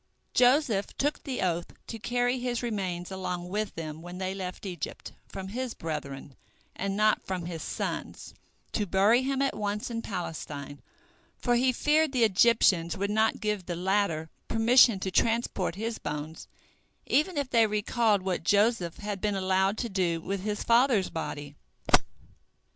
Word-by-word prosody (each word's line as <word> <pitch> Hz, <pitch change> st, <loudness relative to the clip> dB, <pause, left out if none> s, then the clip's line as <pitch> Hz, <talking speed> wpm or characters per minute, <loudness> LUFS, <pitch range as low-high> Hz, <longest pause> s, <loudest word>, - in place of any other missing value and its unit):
Joseph 245 Hz, -5 st, +3 dB
took 290 Hz, +2 st, 0 dB
the 265 Hz, -4 st, -3 dB
oath, 175 Hz, -2 st, -1 dB
to 225 Hz, -, -7 dB
carry 245 Hz, +2 st, 0 dB
his 245 Hz, -1 st, -2 dB
remains 190 Hz, -6 st, -3 dB
along 180 Hz, -2 st, -4 dB
with 210 Hz, +2 st, -2 dB
them 155 Hz, -1 st, -6 dB
when 175 Hz, +1 st, -8 dB
they 190 Hz, 0 st, -2 dB
left 185 Hz, 0 st, -6 dB
Egypt, 180 Hz, -5 st, -6 dB, 0.2 s
from 190 Hz, 0 st, -7 dB
his 250 Hz, +3 st, -4 dB
brethren, 140 Hz, -3 st, -6 dB, 0.4 s
and 195 Hz, 0 st, -2 dB
not 215 Hz, 0 st, +3 dB
from 185 Hz, -3 st, -4 dB
his 170 Hz, -2 st, -5 dB
sons, -, -, -4 dB, 0.4 s
to 210 Hz, -2 st, -1 dB
bury 200 Hz, +7 st, +4 dB
him 270 Hz, +1 st, 0 dB
at 275 Hz, -, 0 dB
once 210 Hz, +2 st, -3 dB
in 230 Hz, 0 st, -2 dB
Palestine, 150 Hz, -8 st, -6 dB, 0.6 s
for 245 Hz, -, +1 dB
he 255 Hz, +2 st, +3 dB
feared 300 Hz, +3 st, +2 dB
the 245 Hz, -3 st, +3 dB
Egyptians 195 Hz, -5 st, +4 dB
would 200 Hz, +2 st, -1 dB
not 220 Hz, +1 st, +2 dB
give 210 Hz, -4 st, -2 dB
the 175 Hz, -, -2 dB
latter 180 Hz, -3 st, 0 dB, 0.2 s
permission 230 Hz, -1 st, +5 dB
to 190 Hz, 0 st, -3 dB
transport 225 Hz, -4 st, +1 dB
his 225 Hz, +3 st, -3 dB
bones 150 Hz, +2 st, -5 dB, 0.6 s
even 310 Hz, +3 st, +1 dB
if 280 Hz, -2 st, -1 dB
they 230 Hz, -2 st, +5 dB
recalled 210 Hz, -1 st, +1 dB
what 185 Hz, -3 st, -2 dB
Joseph 205 Hz, -2 st, +2 dB
had 205 Hz, -2 st, -5 dB
been 210 Hz, -1 st, 0 dB
allowed 190 Hz, +2 st, +1 dB
to 235 Hz, -, -2 dB
do 180 Hz, -5 st, 0 dB
with 195 Hz, +4 st, -3 dB
his 210 Hz, +1 st, -2 dB
father's 235 Hz, -4 st, +3 dB
body. 150 Hz, -3 st, -5 dB
200 Hz, 160 wpm, -28 LUFS, 180-235 Hz, 0.6 s, permission